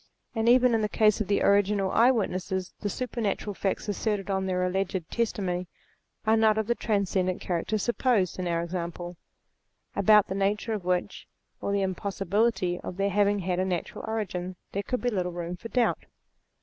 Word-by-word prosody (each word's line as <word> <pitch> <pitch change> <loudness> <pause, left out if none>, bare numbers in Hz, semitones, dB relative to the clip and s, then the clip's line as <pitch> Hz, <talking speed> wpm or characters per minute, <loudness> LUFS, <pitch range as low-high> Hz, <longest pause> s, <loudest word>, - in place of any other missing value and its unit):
And 225 0 +2
even 250 0 +5
in 225 - +2
the 210 - 0
case 215 -1 +3
of 210 - -2
the 200 - +2
original 200 -1 +3
eye 235 +2 +5
witnesses, 190 -5 -1
the 205 - -1
super 250 +3 -4
natural 205 0 -1
facts 195 +2 -2
asserted 205 -1 -1
on 190 0 0
their 180 -1 0
alleged 190 +1 0
testimony, 190 -6 -1 0.6
are 220 +1 +4
not 220 -1 +4
of 220 - +1
the 235 - +2
transcendant 195 -5 0
character 180 +4 -1
supposed 230 -4 +1
in 180 - -2
our 170 -1 0
example, 175 0 -5 0.8
about 210 +1 +6
the - - -3
nature 205 +3 0
of 210 -4 -3
which, 180 -1 -1 0.3
or - - -1
the 200 -1 +1
impossi 195 +1 -3
bility 195 -3 +1
of 185 - -6
their 200 0 +1
having 205 +1 +3
had 180 0 -1
a 185 - +1
natural 180 -3 -3
origin, 185 -5 -3 0.2
there 200 - -1
could 250 +4 -3
be 245 - 0
little 180 -4 -1
room 175 0 -4
for 230 +6 -9
doubt. 245 -1 +1
200 Hz, 190 wpm, -27 LUFS, 185-215 Hz, 0.8 s, about